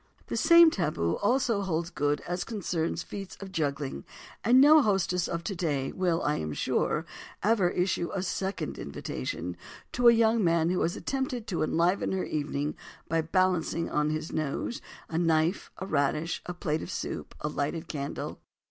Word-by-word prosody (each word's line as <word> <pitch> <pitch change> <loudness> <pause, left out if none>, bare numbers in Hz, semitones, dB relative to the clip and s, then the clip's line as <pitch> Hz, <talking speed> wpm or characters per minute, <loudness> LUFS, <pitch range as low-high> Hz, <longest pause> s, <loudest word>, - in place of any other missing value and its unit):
The - - -2
same 335 -1 +7
"taboo" 150 - 0
also 235 -1 +1
holds 170 -2 -2
good 145 -3 0
as 175 +1 -3
concerns 175 -7 -2
feats 195 -2 -8
of 195 -1 -8
juggling 140 - -2 0.4
and 245 +3 +6
no 300 +3 +8
hostess 180 -5 +1
of 170 0 -3
today 160 -8 -1
will, 175 -3 0
I 150 - +1
am 75 -1 -3
sure, - - 0 0.4
ever 205 -3 +3
issue 180 -1 0
a 190 - -2
second 190 -4 -3
invitation 70 +4 -4 0.4
to 245 0 +3
a - - +11
young 225 -1 +3
man 165 -1 +3
who 185 - 0
has 170 - 0
attempted 265 -4 -3
to 180 - -1
enliven 170 +5 +1
her 190 - -1
evening 150 -1 -2 0.3
by 165 0 +2
balancing, 170 -1 +1
on 150 0 +1
his 155 +1 -3
nose, 155 +9 -2 0.3
a 165 - -2
knife, 165 +1 +1
a 190 - -5
radish, 150 0 0
a 180 - -4
plate 155 -2 -1
of - - -7
soup - - -5
and 150 0 -3
a - - -13
lighted 160 +4 -2
candle. 140 -2 -5
170 Hz, 170 wpm, -28 LUFS, 155-195 Hz, 0.4 s, a